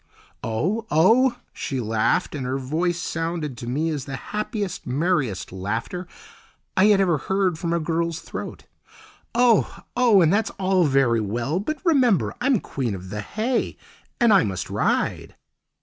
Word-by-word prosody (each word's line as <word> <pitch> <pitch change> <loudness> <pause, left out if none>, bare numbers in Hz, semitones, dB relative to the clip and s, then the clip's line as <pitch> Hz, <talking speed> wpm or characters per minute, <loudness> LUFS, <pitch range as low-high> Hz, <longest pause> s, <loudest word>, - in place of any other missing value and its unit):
"Oh, 185 - -1
oh," 235 +11 +4 0.2
she 135 - -3
laughed, 110 -2 +1
and 145 -3 -4
her 130 +2 -1
voice 160 +6 -1
sounded 165 -4 -3
to 120 - -7
me 155 +6 0
as 145 -3 -4
the 135 - -5
happiest, 210 - -4
merriest 135 - 0
laughter 115 - -4 0.7
I 190 - +5
had 210 -2 +5
ever 175 -6 +2
heard 190 0 0
from 170 - -2
a 170 - +1
girl's 165 0 -1
throat. - - -7 0.7
"Oh, 240 -2 +3
oh! 225 -8 +5
that's 200 +7 +2
all 190 -2 +2
very 135 -5 +3
well. 120 - -1
But 305 +10 -3
remember 255 - +3
I'm 255 -3 +3
Queen 120 -7 -3
of 95 0 -9
the 105 0 -3
Hay, 230 - -2 0.4
and 235 -3 +5
I 195 - +6
must 95 -3 -4
ride!" - - -1
165 Hz, 150 wpm, -23 LUFS, 130-205 Hz, 0.7 s, I